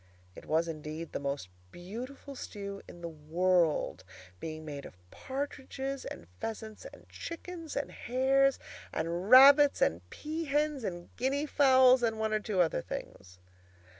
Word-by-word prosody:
It -, -, -12 dB
was, 160 Hz, +2 st, +2 dB
indeed, 155 Hz, 0 st, -6 dB
the -, -, -3 dB
most 140 Hz, -8 st, -3 dB, 0.2 s
beautiful 250 Hz, +10 st, -8 dB
stew 200 Hz, -5 st, -7 dB
in 175 Hz, -, -12 dB
the 170 Hz, -, -4 dB
world, 165 Hz, +1 st, +1 dB, 0.4 s
being 155 Hz, -1 st, -6 dB
made 145 Hz, -2 st, -6 dB
of 90 Hz, -, -12 dB
partridges, 270 Hz, 0 st, -5 dB
and -, -, -7 dB
pheasants, 220 Hz, -1 st, -6 dB
and -, -, -12 dB
chickens, 335 Hz, -1 st, -7 dB
and 280 Hz, -, -2 dB
hares, 270 Hz, +2 st, +2 dB, 0.3 s
and 170 Hz, +4 st, -2 dB
rabbits, 280 Hz, +3 st, +8 dB
and 85 Hz, +2 st, +2 dB
pea 315 Hz, -, -5 dB
hens, 295 Hz, -2 st, 0 dB
and 175 Hz, -4 st, -6 dB
guinea 275 Hz, +4 st, 0 dB
fowls, 260 Hz, -3 st, +6 dB
and 225 Hz, -2 st, +1 dB
one 220 Hz, 0 st, -1 dB
or 215 Hz, -, +2 dB
two 205 Hz, -3 st, 0 dB
other 160 Hz, -, +1 dB
things. 90 Hz, +4 st, -8 dB
220 Hz, 145 wpm, -31 LUFS, 165-275 Hz, 0.4 s, rabbits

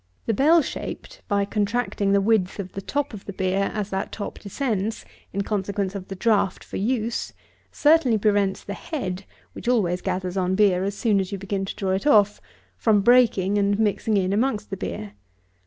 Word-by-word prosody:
The 225 Hz, -, +1 dB
bell 310 Hz, +8 st, +5 dB
shaped, -, -, -7 dB
by 200 Hz, -2 st, +1 dB
contracting 205 Hz, -1 st, 0 dB
the 200 Hz, 0 st, +4 dB
width 195 Hz, -3 st, +1 dB
of 190 Hz, -3 st, -5 dB
the 195 Hz, -, -6 dB
top 285 Hz, +5 st, -2 dB
of 205 Hz, -, -9 dB
the 200 Hz, -, -6 dB
beer, 190 Hz, +1 st, 0 dB
as 210 Hz, -1 st, -4 dB
that 190 Hz, 0 st, -2 dB
top 205 Hz, -, -6 dB
descends, 215 Hz, -1 st, -2 dB, 0.3 s
in 200 Hz, +1 st, -1 dB
consequence 200 Hz, -1 st, -2 dB
of 195 Hz, -2 st, -6 dB
the 195 Hz, -, -6 dB
draft 200 Hz, -1 st, +1 dB
for -, -, -7 dB
use, 230 Hz, +2 st, -1 dB, 0.4 s
certainly 290 Hz, -7 st, +4 dB
prevents 205 Hz, -2 st, +1 dB
the 200 Hz, -, -5 dB
head 190 Hz, -, -5 dB, 0.3 s
(which -, -, -9 dB
always 185 Hz, -8 st, +2 dB
gathers 185 Hz, 0 st, -2 dB
on 185 Hz, 0 st, +1 dB
beer 190 Hz, -3 st, +3 dB
as 200 Hz, +1 st, -3 dB
soon 215 Hz, -4 st, +2 dB
as 190 Hz, -1 st, -3 dB
you 200 Hz, -, -3 dB
begin 195 Hz, 0 st, -3 dB
to -, -, -6 dB
draw 195 Hz, -3 st, -2 dB
it 190 Hz, +9 st, -1 dB
off) 210 Hz, -6 st, +4 dB, 0.4 s
from 215 Hz, -3 st, +3 dB
breaking 205 Hz, -4 st, +4 dB
and 200 Hz, 0 st, +2 dB
mixing 215 Hz, 0 st, +1 dB
in 190 Hz, 0 st, +1 dB
amongst 215 Hz, -2 st, 0 dB
the 195 Hz, -, -3 dB
beer. 105 Hz, -, -5 dB
200 Hz, 190 wpm, -24 LUFS, 190-225 Hz, 0.4 s, bell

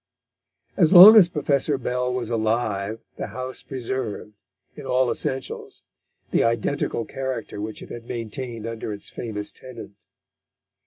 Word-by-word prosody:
As 165 Hz, -5 st, +4 dB
long 195 Hz, +4 st, +11 dB
as 190 Hz, -6 st, +8 dB
Professor 145 Hz, -3 st, 0 dB
Bell 125 Hz, 0 st, -2 dB
was 125 Hz, -2 st, -3 dB
alive 110 Hz, -2 st, -1 dB, 0.2 s
the -, -, -4 dB
house 130 Hz, 0 st, -5 dB
preserved, 125 Hz, -5 st, -5 dB, 0.4 s
in -, -, -10 dB
all 125 Hz, -1 st, +1 dB
essentials, 130 Hz, 0 st, -4 dB, 0.5 s
the -, -, +3 dB
identical 115 Hz, 0 st, -1 dB
character 130 Hz, -6 st, -5 dB
which 110 Hz, 0 st, -6 dB
it -, -, -12 dB
had 120 Hz, -1 st, -8 dB
maintained 115 Hz, 0 st, -6 dB
under 115 Hz, -1 st, -5 dB
its 100 Hz, -, -6 dB
famous 105 Hz, -3 st, -5 dB
tenant. 115 Hz, -5 st, -12 dB
120 Hz, 130 wpm, -23 LUFS, 110-130 Hz, 0.5 s, long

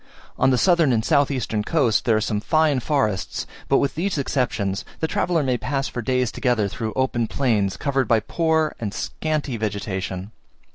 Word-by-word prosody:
On -, -, +3 dB
the 130 Hz, -, +3 dB
southern 170 Hz, -2 st, +4 dB
and 110 Hz, -2 st, 0 dB
south 145 Hz, -3 st, +3 dB
eastern 120 Hz, -6 st, -1 dB
coasts 120 Hz, -6 st, +2 dB
there 115 Hz, -2 st, +2 dB
are -, -, 0 dB
some 105 Hz, -1 st, -1 dB
fine 155 Hz, +1 st, +2 dB
forests, 120 Hz, -8 st, -1 dB, 0.2 s
but 135 Hz, -, +5 dB
with 140 Hz, -, +1 dB
these 180 Hz, +2 st, -1 dB
exceptions, 120 Hz, -8 st, -1 dB, 0.2 s
the 160 Hz, -, 0 dB
traveller 165 Hz, -1 st, +1 dB
may 125 Hz, -3 st, 0 dB
pass 135 Hz, 0 st, -2 dB
for 120 Hz, -, -4 dB
days 125 Hz, 0 st, 0 dB
together 120 Hz, -5 st, +1 dB
through 110 Hz, +2 st, -4 dB
open 125 Hz, -3 st, 0 dB
plains, 110 Hz, -8 st, 0 dB
covered 135 Hz, -2 st, 0 dB
by 115 Hz, -, +4 dB
a -, -, -1 dB
poor 160 Hz, +1 st, +1 dB
and 105 Hz, -3 st, -4 dB
scanty 150 Hz, -5 st, -2 dB
vegetation. 100 Hz, -2 st, -3 dB
125 Hz, 185 wpm, -23 LUFS, 110-145 Hz, 0.2 s, but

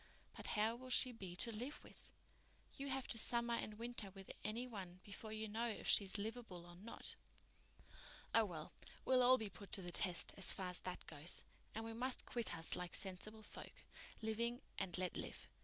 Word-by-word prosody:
But -, -, -5 dB
how 220 Hz, +2 st, +3 dB
will 255 Hz, +1 st, -9 dB
she 255 Hz, 0 st, +5 dB
be 190 Hz, -7 st, -6 dB
to 230 Hz, +6 st, +1 dB
live 245 Hz, +7 st, -4 dB
with? -, -, -12 dB, 0.7 s
You 275 Hz, -, -3 dB
have 265 Hz, -1 st, -1 dB
to 225 Hz, -, +2 dB
summer 235 Hz, +1 st, +2 dB
and 215 Hz, -2 st, -1 dB
winter 230 Hz, -3 st, -2 dB
with 195 Hz, 0 st, -9 dB
any 230 Hz, +4 st, -1 dB
one 190 Hz, -7 st, -6 dB
before 210 Hz, +2 st, -7 dB
you 220 Hz, 0 st, -2 dB
know 225 Hz, +3 st, 0 dB
if 220 Hz, -, -3 dB
she's 200 Hz, 0 st, +6 dB
livable 210 Hz, -4 st, -4 dB
or 175 Hz, 0 st, -11 dB
not." 205 Hz, +6 st, -3 dB, 1.2 s
"Oh, 225 Hz, -1 st, +7 dB
well, 160 Hz, -5 st, -6 dB, 0.3 s
we'll 255 Hz, -1 st, +6 dB
all 255 Hz, +1 st, +8 dB
be 220 Hz, -, -2 dB
put 195 Hz, +1 st, -10 dB
to 195 Hz, -, +5 dB
the 175 Hz, -, -3 dB
test, 180 Hz, -1 st, +4 dB
as 195 Hz, -, +8 dB
far 185 Hz, -1 st, -1 dB
as 180 Hz, -, -1 dB
that 185 Hz, -, -5 dB
goes. 155 Hz, +2 st, 0 dB, 0.3 s
And 225 Hz, +1 st, -2 dB
we 225 Hz, -, -4 dB
must 250 Hz, +3 st, 0 dB
quit 235 Hz, -2 st, 0 dB
us 165 Hz, -, +2 dB
like 180 Hz, -1 st, -1 dB
sensible 210 Hz, +3 st, -1 dB
folk, -, -, -8 dB, 0.4 s
living 235 Hz, +3 st, 0 dB, 0.2 s
and 190 Hz, -2 st, -1 dB
let 180 Hz, -1 st, 0 dB
live. -, -, -5 dB
215 Hz, 195 wpm, -42 LUFS, 185-235 Hz, 1.2 s, all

